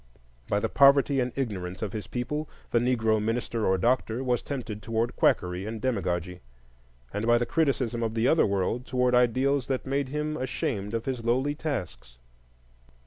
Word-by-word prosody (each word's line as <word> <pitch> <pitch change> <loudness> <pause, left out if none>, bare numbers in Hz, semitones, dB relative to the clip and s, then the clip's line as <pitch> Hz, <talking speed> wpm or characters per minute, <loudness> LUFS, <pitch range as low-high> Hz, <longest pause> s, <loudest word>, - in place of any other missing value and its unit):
By 100 - +2
the - - 0
poverty 140 0 +5
and 125 0 0
ignorance 95 -8 -3
of 105 - -4
his 105 -2 -5
people, 145 +5 -3 0.2
the 120 - +4
Negro 115 -3 +2
minister 115 0 -1
or 95 - +3
doctor 120 +3 +1
was 125 -2 +1
tempted 120 -7 -5
toward 115 +2 -1
quackery 90 +2 +1
and 110 0 -5
demagogy; 90 -7 -2 0.7
and 105 +3 -2
by 120 0 +5
the 120 - 0
criticism 130 -6 0
of 110 -1 -2
the 115 +2 +2
other 160 - +4
world, 100 +6 -1
toward 125 -1 +1
ideals 130 +3 +2
that 130 -2 -2
made 135 0 -1
him 150 +2 -2
ashamed 125 -5 -3
of 115 - -3
his 130 -3 -3
lowly 130 +5 +1
tasks. 90 - -5
120 Hz, 170 wpm, -27 LUFS, 105-130 Hz, 0.7 s, poverty